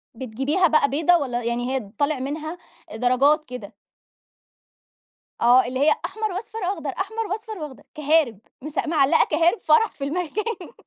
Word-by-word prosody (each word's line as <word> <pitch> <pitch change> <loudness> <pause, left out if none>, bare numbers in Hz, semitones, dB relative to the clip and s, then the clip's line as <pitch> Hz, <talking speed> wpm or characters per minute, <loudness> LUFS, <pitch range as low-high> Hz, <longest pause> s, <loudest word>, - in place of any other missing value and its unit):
بتجيبيها 270 +9 0
بقى 305 -2 +3
بيضا 320 +5 +3
والّا 245 -6 -1
يعني 240 +2 -2
هي 215 -7 -4
طالع 285 -1 0
منها 310 +5 -4 0.4
درجات 270 +6 +3
كده؟ 245 -5 -9 1.7
آه. 245 +1 +6
اللي 255 +2 -3
هي 300 +2 +4
أحمر 430 +3 -3
وأصفر 440 +3 -6
وأخضر، 360 -6 -3
أحمر 440 +8 -3
وأصفر 435 0 -5
وأخضر، 300 -5 -8
كَهَارِب 300 -8 +2 0.2
مش 305 +2 -7 0.2
معلَّقة 290 -4 +4
كَهَارِب 335 +7 +2
فَرَح 315 +9 +3
في 275 - -9
المكان. 360 +7 -3
305 Hz, 145 wpm, -23 LUFS, 260-360 Hz, 1.7 s, آه